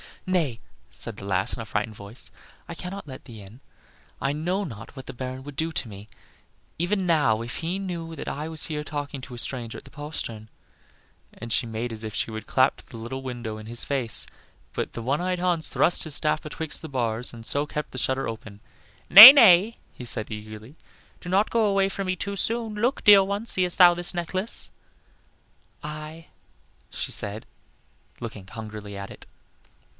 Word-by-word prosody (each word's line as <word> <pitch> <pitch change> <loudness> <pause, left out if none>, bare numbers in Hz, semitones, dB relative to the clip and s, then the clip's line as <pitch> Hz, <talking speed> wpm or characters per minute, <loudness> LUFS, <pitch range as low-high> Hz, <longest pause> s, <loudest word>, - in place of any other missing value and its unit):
"Nay," 165 -11 0 0.3
said 115 -3 -7
the 100 - -9
lass, 95 +2 0
in 125 - -6
a - - -7
frightened 110 0 -3
voice, 100 +4 -8 0.4
"I 170 - -6
cannot 180 +2 -7
let 130 -2 -10
thee 115 -5 -11
in; 100 +5 -14 0.6
I 140 +1 -1
know 175 +7 -1
not 115 - -9
what 130 - -9
the - - -8
Baron 130 +1 -6
would 145 0 -10
do 160 +3 -2
to 130 - -2
me, 105 0 -11 0.7
even 190 +3 0
now, 140 -11 +2
if 120 +2 -5
he 170 +3 -3
knew 170 -4 -5
that - - -7
I 150 +2 -4
was 160 -2 -4
here 150 -2 -4
talking 145 -2 -5
to 125 - -10
a - - -9
stranger 120 -1 -4
at - - -11
the - - -16
postern;" 120 -8 -6 0.8
and 120 -1 -9
she 120 - +1
made 115 +2 -4
as 110 0 -7
if 110 -1 -6
she - - -1
would 110 0 -7
clap 130 0 +2
to - - -17
the 115 - -10
little 120 +4 -6
window 120 -4 -6
in 110 - -10
his 120 +1 0
face; 130 -6 0 0.5
but - - -4
the 115 - -6
one 140 +7 0
eyed 180 0 -1
Hans 175 -3 +2
thrust 175 - +2
his 155 -3 0
staff 155 0 0
betwixt 155 0 -3
the 160 - -8
bars 120 -3 -2
and 115 -1 -11
so 145 +4 -1
kept 150 0 -5
the - - -8
shutter 130 +2 0
open. 110 -2 -8 0.5
"Nay, 210 +8 +15
nay," 225 -5 +6 0.3
said 115 -3 +1
he, 110 - -4
eagerly, 110 +5 -11 0.4
"do 180 - -9
not 195 +4 +2
go 230 -2 +2
away 195 -1 +2
from 195 0 -4
me 185 - 0
too 200 +2 -4
soon. 225 +2 +1
Look, 240 +6 -1
dear 205 -2 +8
one; 200 +3 -3
seest 185 -5 +1
thou 175 -1 +8
this 175 +1 -1
necklace?" 185 +5 0 1.1
"Aye," 155 +2 -8 0.6
said 105 +2 -1
she, - - -36
looking 105 -5 -8
hungrily 105 -2 -8
at 100 0 -7
it. - - -12
140 Hz, 195 wpm, -25 LUFS, 115-175 Hz, 1.1 s, Nay